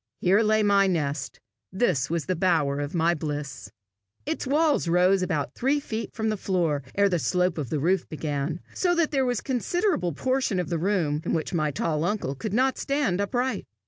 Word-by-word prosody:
Here 195 +4 +3
lay 215 0 +3
my 200 -1 +4
nest; 145 -6 -2 0.3
this 185 - +1
was 165 -1 -1
the 185 - -1
bower 160 -6 +1
of 145 +3 -4
my 170 +1 +3
bliss. 145 -8 -5 0.6
Its 315 -3 -3
walls 295 - +2
rose 180 +3 +4
but 185 - 0
about 150 -6 -2
three 275 +4 +1
feet 225 -5 -5
from 220 -1 -1
the 215 - -1
floor 170 -7 0
ere 200 0 +4
the 180 -3 0
slope 180 0 0
of 140 -6 -4
the 155 - -1
roof 180 +5 +1
began, 150 +1 -3
so 355 -1 +1
that 335 -2 +1
there 270 -3 +1
was 245 -3 0
a - - -26
considerable 280 - 0
portion 255 - 0
of 180 - -2
the 170 -2 -1
room 165 -5 0
in - - -2
which 160 +1 -2
my 155 -3 +1
tall 150 +2 -1
uncle 175 -7 -1
could 205 +9 -5
not 260 +5 +1
stand 275 -10 0
upright. 245 +6 -1
180 Hz, 205 wpm, -26 LUFS, 155-225 Hz, 0.6 s, my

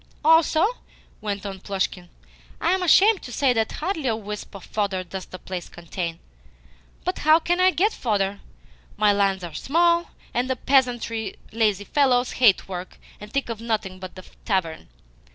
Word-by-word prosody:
"Also," 320 +1 +5 0.6
went 205 -2 -4
on 195 -1 -5
Plushkin, 190 -2 -3 0.5
"I 335 - +1
am 375 0 +1
ashamed 390 +4 +5
to 245 - -9
say 255 +2 +2
that 225 -2 0
hardly 320 -4 -2
a 225 - +2
wisp 210 -1 -7
of 195 - -9
fodder 200 -3 -1
does 185 +1 -7
the 185 - -9
place 185 -1 -6
contain. 170 0 -5 0.9
But 365 - -2
how 310 +1 +6
can 350 +2 0
I 370 0 +6
get 395 +4 +1
fodder? 200 -3 -1 0.6
My 210 -1 +4
lands 195 -2 +1
are 170 -2 -6
small, 340 - +2 0.2
and 250 +2 0
the 260 - +1
peasantry 240 -4 +1 0.2
lazy 215 -3 +1
fellows 255 -2 +2
who - - -8
hate 225 -7 +5
work 185 -1 -7 0.2
and 210 +1 -10
think 275 +2 -1
of 230 -2 -5
nothing 215 -5 -2
but 185 -1 -9
the 185 - -11 0.2
tavern. 180 -6 -2
220 Hz, 170 wpm, -24 LUFS, 190-280 Hz, 0.9 s, how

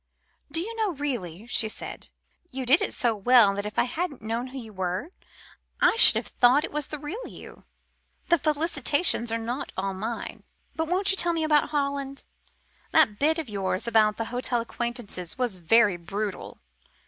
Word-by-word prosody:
"Do 325 - +2
you 445 +7 -4
know, 430 -4 0
really," 230 - -4
she 230 -1 -1
said, 215 - -6 0.4
"you 260 0 -5
did 270 +7 +5
it - - -1
so 235 -3 0
well 215 -1 +5
that 200 +1 -4
if 210 - -9
I - - +4
hadn't 285 0 -4
known 230 +3 -3
who 265 +1 -9
you 225 -4 -9
were, 185 - -3 0.7
I - - +4
should - - +9
have - - -1
thought 250 +5 +3
it - - -5
was 295 -1 -3
the 300 - -5
real 325 - -7
you. - - -13 0.6
The 340 -2 +4
felicitations 300 -4 +1
are 230 - 0
not 240 +5 -5
all 195 +1 -2
mine. 220 +5 -6 0.3
But 320 0 -2
won't 380 +4 +2
you 390 - -1
tell 345 -2 +4
me 325 -1 -1
about 300 -1 +3
Holland? 280 -2 -3 0.7
That 270 -10 +4
bit 315 +3 +2
of 320 -4 -4
yours 190 -3 -2
about 220 -2 +3
the 225 - -2
hotel 245 -1 0
acquaintances 235 -6 -5
was 245 -7 -1
very 205 +2 +3
brutal. 195 +3 -5
245 Hz, 185 wpm, -26 LUFS, 215-300 Hz, 0.7 s, should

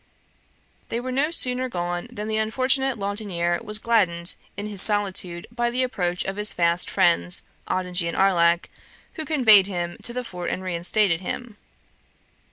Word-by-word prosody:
They 230 - -2
were 255 +1 -5
no 275 +4 0
sooner 255 -5 +1
gone 175 0 -4
than 215 -3 -6
the 220 0 -1
unfortunate 260 +4 0
Laudonniere 195 -4 -2
was 210 -2 0
gladdened 185 -7 +1 0.2
in 205 - -4
his 205 -3 +2
solitude 190 -4 +2
by 240 0 -1
the 250 +2 0
approach 180 -8 -2
of 195 +1 -4
his 210 +1 +2
fast 170 0 +1
friends 170 - +3 0.2
Ottigny 180 -1 -1
and 170 - -4
Arlac, 170 -3 +2 0.4
who 315 - -6
conveyed 220 -11 +5
him 175 -3 -4
to - - -5
the 250 +1 -4
fort 180 -6 -6
and 185 - -4
reinstated 180 0 0
him. 230 +4 -6
200 Hz, 160 wpm, -23 LUFS, 175-235 Hz, 0.4 s, conveyed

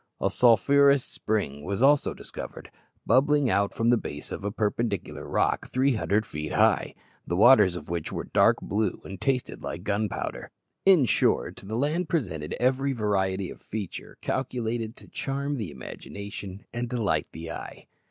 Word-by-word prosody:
A - - +1
sulphurous 140 +4 +5
spring 75 -10 -2
was 100 +9 -1
also 145 +1 +4
discovered, - - -8 0.3
bubbling 140 -1 +3
out 100 0 +2
from 115 +1 +1
the 120 - +5
base 75 -8 -6
of - - -5
a 100 - -1
perpendicular 105 -2 -2
rock - - 0
three 130 +1 +2
hundred 105 +1 +1
feet 75 -3 -5
high, - - +3 0.3
the 85 - -1
waters 100 -2 +6
of 90 - -7
which 85 -2 -3
were - - -3
dark - - +4
blue 105 -1 -1
and 95 -1 -8
tasted 130 -2 -1
like 85 +1 -5
gunpowder. 105 0 -2 0.4
In 180 -9 +7
short, - - +1
the 105 +3 -5
land 155 +7 0
presented 90 - -2
every 135 +3 +1
variety 95 -4 0
of - - -12
feature 105 -4 -6
calculated 120 -3 -2
to - - -14
charm 140 +1 -3
the 105 -8 -4
imagination 100 +8 -8
and 120 0 -3
delight 100 -11 0
the 80 +1 -7
eye. - - -8
110 Hz, 160 wpm, -27 LUFS, 95-130 Hz, 0.4 s, In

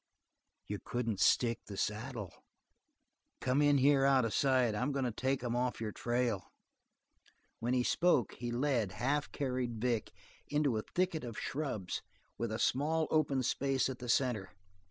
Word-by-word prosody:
"You 105 -1 -4
couldn't 115 -5 -2
stick 115 +4 +3
the 100 - -7
saddle. 105 -2 -3 1.1
Come 130 +3 +1
in 145 -1 +5
here 140 0 +4
out 135 -3 +4
of 115 - -2
sight; 130 -4 +3
I'm 125 +7 0
going 135 -2 -1
to 120 - 0
take 130 +3 -1
'em 120 -1 -1
off 125 0 0
your 110 -1 -3
trail." 120 -3 -1 1.1
While 120 +2 0
he 125 -1 +2
spoke, 170 -3 +2
he 120 0 -5
led, 120 -5 0
half 145 +3 -1
carried 125 -4 -2
Vic, 120 -1 0 0.4
into 145 -4 +1
a 110 - 0
thicket 180 -4 +1
of 115 -3 -6
shrubs 130 -11 -3 0.3
with 115 -1 -3
a 110 - -1
small 155 +6 +1
open 140 -4 +2
space 135 +2 +1
at 130 - -6
the 125 -1 -6
center. 120 -6 +1
125 Hz, 160 wpm, -34 LUFS, 115-140 Hz, 1.1 s, in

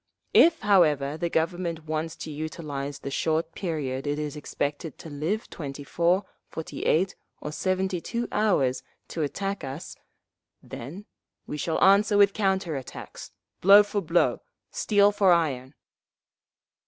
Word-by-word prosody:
If, 330 0 +6
however, 155 -8 +3
the 170 +2 -2
Government 165 -1 -1
wants 155 +1 -3
to 160 - -7
utilise 145 -2 -5
the 140 - -7
short 160 +3 0
period 145 -7 -3
it 145 0 0
is 150 0 -4
expected 145 +1 -4
to 160 - -10
live—twenty 150 -3 -4
four, 175 +6 +1 0.2
forty 160 - -6
eight, 180 +4 +2 0.2
or 150 - -5
seventy 185 +1 -1
two 235 +6 -3
hours—to 165 -6 -1
attack 195 +7 -3
us, 135 +6 -7 0.7
then 170 - -8 0.4
we 150 - -5
shall 160 +2 -1
answer 205 +2 +5
with 200 -1 +5
counter 190 -5 0
attacks, 130 -2 -8 0.3
blow 200 +3 +8
for 205 0 -2
blow, 170 0 +1 0.3
steel 205 -1 +3
for 200 -2 +4
iron!" 140 -6 +1
165 Hz, 130 wpm, -26 LUFS, 150-195 Hz, 0.7 s, blow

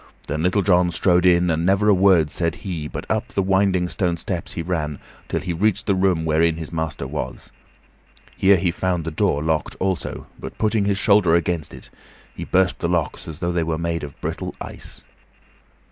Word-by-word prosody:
Then 75 +2 -2
Little 90 +4 +2
John 90 -2 +3
strode 90 +1 +3
in, 90 -1 +4
and 80 +1 0
never 100 +3 +2
a 105 - +6
word 90 -5 +4
said 85 -1 -1
he, 85 -6 -3
but - - -6
up - - -1
the 100 - -1
winding 95 -1 +2
stone 90 -2 -1
steps 85 0 -4
he 85 - -4
ran 80 -4 -2 0.3
till - - -1
he 90 - -3
reached 105 +4 +1
the 100 - +2
room 95 -4 +1
wherein 80 +1 +2
his 80 0 -6
master 80 -2 -3
was. - - -6 0.8
Here 95 0 +5
he 85 0 +1
found 90 -2 -1
the 80 - -3
door 75 -1 0
locked 80 -1 -1
also, 95 -6 -2
but, - - -8
putting 110 -2 +1
his 100 -1 +1
shoulder 100 -4 +4
against 85 -2 -1
it, - - -12 0.4
he - - -6
burst 95 -1 +2
the 85 - -1
locks 85 -4 -1
as 80 -2 -7
though 85 +1 -2
they 85 -1 0
were 80 -1 -1
made 85 0 -2
of 70 -2 -9
brittle - - -4
ice. - - -9
85 Hz, 200 wpm, -22 LUFS, 80-95 Hz, 0.8 s, a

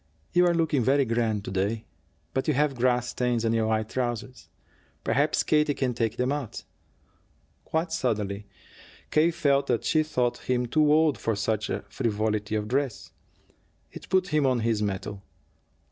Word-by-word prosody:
"You 180 0 +5
are 175 - +3
looking 155 -6 +1
very 135 +3 +3
grand 115 -3 0
to - - -5
day. 100 +4 -1 0.5
But 130 - -1
you 155 - +2
have 145 0 +2
grass 125 -1 +1
stains 120 -2 0
on 115 - +2
your 110 -1 +1
white 110 -1 0
trousers. 125 0 -4 0.5
Perhaps - - +2
Katie 150 -1 +2
can 130 -2 0
take 115 -2 -1
them 125 +2 +1
out." 145 -6 -4 1.0
Quite 160 +1 -1
suddenly 105 -6 -2 0.6
K. 155 +2 +4
felt 140 -4 +1
that 120 -2 0
she 155 - +3
thought 125 -6 -1
him 125 -1 +2
too 150 +4 +3
old 155 -2 +3
for 115 - 0
such 105 +1 -1 0.2
frivolity 110 -1 -1
of 105 -1 -1
dress. 135 0 -2 0.8
It - - -11
put 185 -1 +2
him 150 -4 +2
on 125 -3 +1
his 110 -2 0
mettle. 100 0 -3
125 Hz, 160 wpm, -27 LUFS, 110-145 Hz, 1.0 s, You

